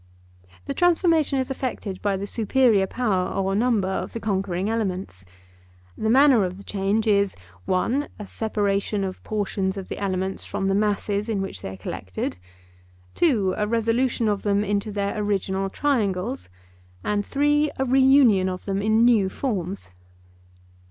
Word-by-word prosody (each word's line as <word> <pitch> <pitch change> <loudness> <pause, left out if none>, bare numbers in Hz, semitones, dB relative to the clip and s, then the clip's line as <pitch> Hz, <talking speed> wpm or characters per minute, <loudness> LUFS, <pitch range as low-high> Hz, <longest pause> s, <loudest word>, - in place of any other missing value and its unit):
The - - -3
transformation 335 -5 +2
is 260 0 -1
effected 235 -8 -4
by 200 -2 0
the 195 - -4
superior 220 -1 +2
power 195 -6 0
or 195 0 -1
number 220 -2 +2
of 190 - -3
the 230 - -4
conquering 190 -3 -1
elements. 190 - -3 0.7
The 220 - -1
manner 260 -2 +6
of 185 0 -3
the 200 - -11
change 200 +3 -1
is 200 -2 +2 0.3
(1) 250 +10 0
a 210 - -8
separation 205 -2 -1
of 190 -1 -5
portions 200 -2 -2
of 190 - -7
the - - -5
elements 190 -1 -2
from 195 - -2
the - - +2
masses 205 +1 0
in 215 -3 0
which 195 0 -5
they - - -5
are 95 - -8
collected; 95 -1 -5 0.8
(2) 215 - +2
a 210 - -1
resolution 230 +1 +1
of 205 -2 0
them 205 0 +1
into 205 +1 -1
their 200 -1 -2
original 195 -1 -1
triangles; 225 - -1 0.5
and 205 0 0
(3) 295 +4 +2
a 265 - 0
reunion 260 -7 +5
of 185 0 -6
them 195 0 -1
in 220 +2 +3
new 220 -6 +4
forms. 195 - -3
205 Hz, 155 wpm, -24 LUFS, 195-235 Hz, 0.8 s, manner